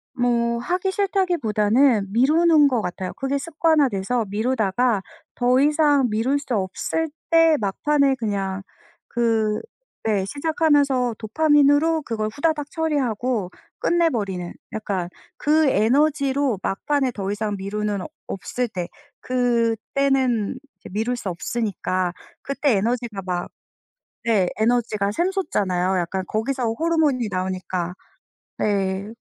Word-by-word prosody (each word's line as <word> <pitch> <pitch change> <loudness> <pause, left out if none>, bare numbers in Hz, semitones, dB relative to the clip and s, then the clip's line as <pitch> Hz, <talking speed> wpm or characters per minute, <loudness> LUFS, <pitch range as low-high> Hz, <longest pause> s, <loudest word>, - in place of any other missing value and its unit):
뭐 235 -1 +1
하기 360 +8 -1
싫다기보다는 260 - +2
미루는 305 +4 +5
것 245 -5 +1
같아요. 180 0 -4
그게 270 +1 -2
습관화돼서 275 - +1
미루다가 220 0 +1 0.3
더 250 +1 +3
이상 290 -2 +3
미룰 235 +7 +1
수 270 -3 -5
없을 210 +11 -2 0.2
때 330 -2 +5
막판에 275 +7 +1
그냥 200 -4 -2 0.5
그 225 -3 +1 0.5
네 200 -3 +1
시작하면서 285 - +1
도파민으로 295 +5 +3
그걸 220 -5 -3
후다닥 295 +5 -1
처리하고 255 - -1 0.3
끝내버리는 210 - 0 0.2
약간. 195 -5 -2 0.3
그 310 +1 +3
에너지로 275 0 +2
막판에 265 +6 0
더 195 -1 -3
이상 210 0 -2
미루는 205 0 -2 0.3
없을 245 +6 -3
때 180 -5 -5 0.3
그때는 245 0 +1 0.2
이제 - - -13
미룰 225 +5 -1
수 205 -5 -4
없으니까 185 -2 -2 0.3
그때 275 -2 0
에너지가 225 -1 -1
막 180 -1 -2 0.8
네. 200 -6 +2
에너지가 220 -3 +1
샘솟잖아요. 195 - 0
약간 185 +2 -2
거기서 245 +4 -2
호르몬이 305 -5 +1
나오니까. 185 -1 -3 0.7
네. 195 -1 0
240 Hz, 265 characters per minute, -22 LUFS, 205-285 Hz, 0.8 s, 미루는